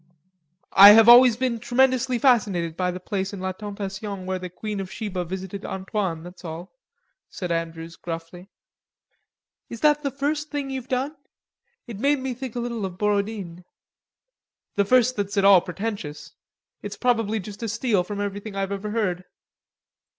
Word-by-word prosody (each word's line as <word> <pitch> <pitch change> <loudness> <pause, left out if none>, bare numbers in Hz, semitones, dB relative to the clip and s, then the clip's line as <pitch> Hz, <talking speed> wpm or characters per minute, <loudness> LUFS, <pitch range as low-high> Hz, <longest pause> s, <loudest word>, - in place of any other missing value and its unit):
"I 200 +2 +11
have 225 +1 +7
always 240 -1 +8
been 245 -2 -1
tremendously 255 +1 +2
fascinated 205 - +2
by 180 0 -1
the 180 0 -4
place 190 +1 -3
in 200 - -6
La 190 0 -2
Tentation 200 0 -6
where 185 0 -2
the 180 0 -6
Queen 210 +3 -5
of 190 -1 -6
Sheba 195 -5 -4
visited 190 +2 -6
Antoine, 190 -3 -3
that's 180 +1 -12
all," 165 +1 -7 0.6
said 180 -2 -5
Andrews 165 0 -4
gruffly. 170 +2 -8 1.2
"Is 230 - -8
that 295 -1 +4
the 280 - -1
first 295 +3 -2
thing 285 -2 -4
you've 260 -2 -5
done? 265 +4 -2 0.7
It 230 -5 -8
made 285 +4 +2
me 260 -1 -3
think 255 -1 -7
a - - -2
little 235 -2 -3
of 185 -2 -5
Borodine." 200 -4 -2 1.1
"The 200 - +1
first 255 +2 +3
that's 200 0 -3
at 200 - +3
all 195 -3 +8
pretentious. 175 -6 -6 0.5
It's 205 - -7
probably 225 -3 +1
just 205 +2 -9
a 230 - -3
steal 215 -3 +1
from 205 +2 -6
everything 205 +1 -5
I've 195 0 -2
ever 200 +1 -4
heard." 185 -5 -1
205 Hz, 165 wpm, -24 LUFS, 185-240 Hz, 1.2 s, I